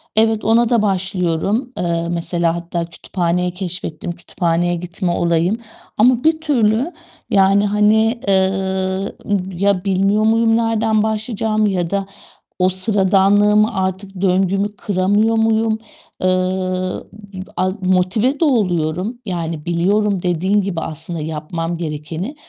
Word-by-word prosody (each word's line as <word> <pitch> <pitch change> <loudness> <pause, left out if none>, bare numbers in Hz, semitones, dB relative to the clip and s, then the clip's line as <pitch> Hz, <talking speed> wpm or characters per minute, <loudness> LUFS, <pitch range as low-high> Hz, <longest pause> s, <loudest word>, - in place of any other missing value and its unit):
Evet, 220 0 +3
ona 230 +1 +4
da 235 -3 +3
başlıyorum. 190 +4 0
Eee, 170 -1 -1
mesela, 170 0 0
hatta 170 0 -3
kütüphaneyi 175 +1 -2
keşfettim, 175 -3 -5
kütüphaneye 175 0 -1
gitme 175 +1 -3
olayım 170 +4 +1 0.4
ama 250 +4 +4
bir 315 0 +2
türlü, 250 -1 +1 0.4
yani, 195 +1 +4
hani, 220 +3 +2
eee, 190 -1 +4 0.8
ım 190 -1 0
ya 200 -1 +1
bilmiyor 195 +2 +2
muyum 225 0 +3
nereden 225 -1 +1
başlayacağımı 220 -1 0
ya 180 -3 -1
da 200 -1 -1 0.5
o 185 - +4
sıradanlığımı 205 +2 +3
artık 190 0 -3
döngümü 195 +2 +1
kıramıyor 205 +4 +1
muyum? 220 0 +2 0.4
Eee, 185 - +2
ı 185 0 -1 0.3
p 185 - -7 0.2
a 185 0 +1
motive 185 +9 +1
de 330 - +3
oluyorum. 185 - 0
Yani 165 -5 -4
biliyorum 195 +3 +1
dediğin 185 +4 +1
gibi 185 -4 -3
aslında 160 +2 -5
yapmam 160 +2 -4
gerekeni 160 - -5
190 Hz, 125 wpm, -18 LUFS, 175-215 Hz, 0.8 s, ona